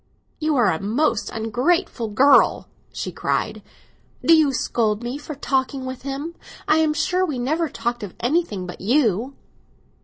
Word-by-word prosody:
"You 310 -1 0
are 235 -7 +4
a 160 - -3
most 230 +2 0
ungrateful 240 - 0
girl!" 260 +7 +4 0.2
she - - -5
cried. - - -2 0.6
"Do 330 - +7
you 310 -3 +4
scold 225 -4 0
me 245 +4 -4
for 300 0 -7
talking 265 -1 -1
with 260 -1 -6
him? 275 +5 -5 0.3
I 310 - +4
am 310 -1 +2
sure 360 +3 +1
we 305 -8 -2
never 310 +6 0
talked 240 0 -3
of 205 -4 -7
anything 240 - 0
but 180 - -9
you!" 240 +2 +1
260 Hz, 155 wpm, -22 LUFS, 225-305 Hz, 0.6 s, Do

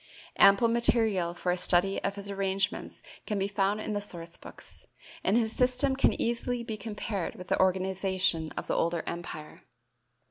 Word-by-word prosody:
Ample 200 +4 +7
material 220 -7 +2
for 180 +1 -1
a 180 - 0
study 180 +2 +1
of 200 0 -1
his 200 0 -5
arrangements 195 -1 -2 0.2
can 210 - -1
be 195 0 0
found 200 +1 0
in 215 - -3
the 205 - -1
source 170 -4 -5
books, - - -12 0.4
and 200 +4 +3
his 225 -2 +1
system 255 +2 +3
can 270 - +2
easily 240 +1 -1
be 225 -2 -4
compared 210 -3 -4
with 180 - -10
the - - +1
organization 185 -3 +1
of - - -3
the - - -2
older 170 0 0
empire. 165 -3 -7
195 Hz, 170 wpm, -29 LUFS, 180-220 Hz, 0.4 s, Ample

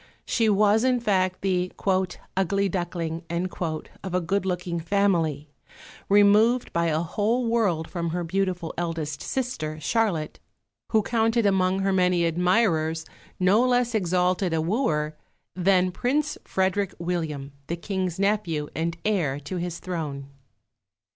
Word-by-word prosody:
She 225 -2 +2
was, 210 +2 +4
in 255 -1 +3
fact, 185 -5 +1
the 185 -2 0 0.6
"ugly 195 +1 +1
duckling" 170 -3 -3
of 175 +1 -4
a - - +3
good 190 +2 -1
looking 180 -1 -2
family, 165 -4 +1 0.6
removed 210 +5 +4
by 170 0 +1
a 155 0 +1
whole 215 +8 0
world 205 -9 +1
from 170 -2 -3
her 175 +2 -2
beautiful 180 -1 -1
eldest 165 -3 -3
sister 160 -13 -3
Charlotte, 180 -4 0 0.5
who 220 -2 +3
counted 225 0 +1
among 190 -1 +2
her 195 0 +1
many 180 -2 +3
admirers 165 -2 +1 0.3
no 195 +6 +4
less 245 -1 +2
exalted 180 -2 +1
a - - +1
wooer 155 - 0 0.4
than 185 0 +3
Prince 285 +9 0
Frederick 190 +1 0
William, 160 -5 -3 0.2
the 170 - -2
King's 185 -1 -3
nephew 195 -7 0
and 170 +1 -2
heir 170 -10 +1
to 165 +6 -5
his 175 -1 -3
throne. 150 -6 -5
180 Hz, 130 wpm, -25 LUFS, 165-205 Hz, 0.6 s, was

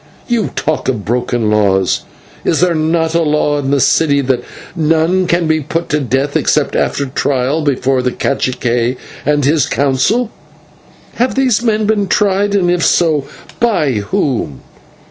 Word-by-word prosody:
You 235 -3 0
talk 155 - -2
of 115 -6 -2
broken 120 -1 -1
laws. 95 -3 +1 0.4
Is 160 - +1
there 180 -1 +3
not 160 +1 0
a 170 - +2
law 150 -1 +1
in 135 -1 -2
the 140 0 +2
city 140 +1 +3
that 125 -2 -1 0.3
none 165 +3 +1
can 170 -1 +1
be 155 0 +1
put 165 +4 -3
to 150 - +1
death 135 +2 -1
except - - +1
after 140 - 0
trial 135 +2 -1
before 135 -2 +1
the 125 - 0
/cacique/ 125 -2 -1 0.3
and 145 -2 +2
his 150 +1 +2
Council? 145 - +1 0.9
Have 250 +2 0
these 255 -5 +2
men 220 -2 +1
been 205 -2 +1
tried, 200 +1 +1
and 180 -3 +2
if 175 -1 0
so, 155 -5 +2 0.3
by 205 - +1
whom? 105 - -2
150 Hz, 155 wpm, -14 LUFS, 130-175 Hz, 0.9 s, there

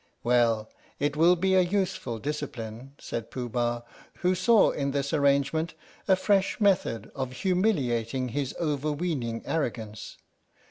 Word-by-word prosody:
"Well, 115 -3 +2 0.3
it 145 +1 0
will 170 +4 +5
be 190 +2 +1
a 185 - +6
useful 180 - -1
discipline," 130 -2 -5
said 115 -1 -5
Pooh 125 -2 -4
Bah, 120 0 -1 0.4
who 180 +1 +3
saw 210 +5 +4
in 140 -1 -2
this 140 0 -1
arrangement 140 +3 +2 0.3
a 190 - +6
fresh 195 +1 +1
method 195 - +1
of 130 -2 -3
humiliating 130 - 0
his 135 +1 -3
overweening 145 -5 -2
arrogance. 110 -8 -3
140 Hz, 130 wpm, -27 LUFS, 120-180 Hz, 0.4 s, a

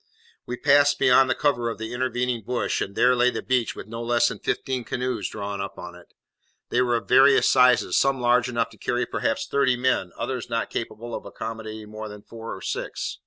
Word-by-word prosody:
We 125 - -4
passed 145 +2 +4
beyond 130 0 +5
the - - +2
cover 120 -5 +1
of 115 - -5
the 110 +1 -6
intervening 125 -1 -1
bush, 125 +3 -2
and 100 - -4
there 125 0 +4
lay 125 0 +4
the - - -5
beach, 125 -3 0
with - - -8
no 115 +2 -7
less 120 0 +2
than - - -7
fifteen 130 -2 -2
canoes 125 +1 -3
drawn 100 -1 -5
up 100 - -6
on 90 0 -8
it. 90 0 -15 0.6
They 125 - +2
were 120 -1 +2
of 115 - -3
various 135 +2 +6
sizes, 125 -2 +4
some 135 -1 +2
large 125 0 +2
enough 115 -2 -1
to 110 - -18
carry 120 0 -1
perhaps 115 - -2
thirty 135 -3 +1
men, 125 -8 0
others 125 -1 -4
not 115 -1 -2
capable 115 +1 -5
of - - -5
accommodating 110 -1 -7
more 110 0 -7
than 105 0 -11
four 115 0 -8
or - - -11
six. - - -4
120 Hz, 215 wpm, -24 LUFS, 110-125 Hz, 0.6 s, various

